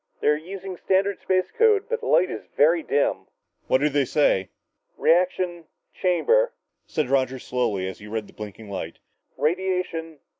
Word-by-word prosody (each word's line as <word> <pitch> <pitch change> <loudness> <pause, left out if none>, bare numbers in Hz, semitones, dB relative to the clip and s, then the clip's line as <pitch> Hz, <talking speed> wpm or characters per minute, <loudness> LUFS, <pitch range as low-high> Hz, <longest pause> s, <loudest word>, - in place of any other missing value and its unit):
They're 150 - +3
using 185 +3 -7
standard 195 +1 +1
space 185 -1 0
code, 435 -3 +4
but 470 0 -1
the 460 - -6
light 180 - +4
is - - -5 0.2
very 165 +3 +5
dim." 145 -2 0 0.4
"What 130 - +3
do 150 - +4
they 145 -1 +1
say?" 110 -10 +2 0.2
"... - - -48
reaction... 175 0 +2 0.3
chamber 475 - +2 0.2
" - - -54
said 155 - -1
Roger 130 0 +1
slowly 120 -7 -1
as 95 - -7
he 105 - -11
read 110 0 -3
the - - -17
blinking 105 0 -9
light, 85 -4 -5 0.2
"... - - -46
radiation 170 -1 -1
165 Hz, 175 wpm, -24 LUFS, 130-185 Hz, 0.4 s, very